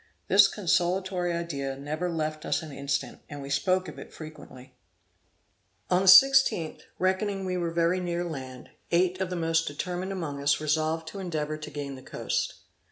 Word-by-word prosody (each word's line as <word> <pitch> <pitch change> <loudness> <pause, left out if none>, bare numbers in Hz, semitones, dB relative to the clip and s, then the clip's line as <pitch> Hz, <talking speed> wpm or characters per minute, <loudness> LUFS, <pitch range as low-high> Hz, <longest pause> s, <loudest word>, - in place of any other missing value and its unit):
This 195 +1 +7
consolatory 180 -1 0
idea 140 -6 -3
never 155 +5 -3
left 155 -1 -3
us - - -1
an 155 - -8
instant, 140 0 -3
and 145 - -7
we 140 0 -7
spoke 185 +7 +1
of 155 - -9
it - - -10
frequently. 145 -5 -11 1.2
On 180 - +4
the 195 - -1
16th, 190 -5 +6 0.2
reckoning 190 +1 0
we 185 -1 -2
were 175 -2 -1
very 170 +2 +1
near 175 -1 -2
land, 130 -6 -7 0.2
eight 180 +2 +2
of 190 - -1
the 180 - -3
most 165 -1 +1
determined 180 +6 -3
among 155 -7 -4
us 140 0 +2
resolved 155 +1 0
to 200 - -8
endeavor 155 -5 -3
to 155 - -7
gain 145 -1 -5
the 130 - -10
coast. - - -3
165 Hz, 170 wpm, -27 LUFS, 145-185 Hz, 1.2 s, This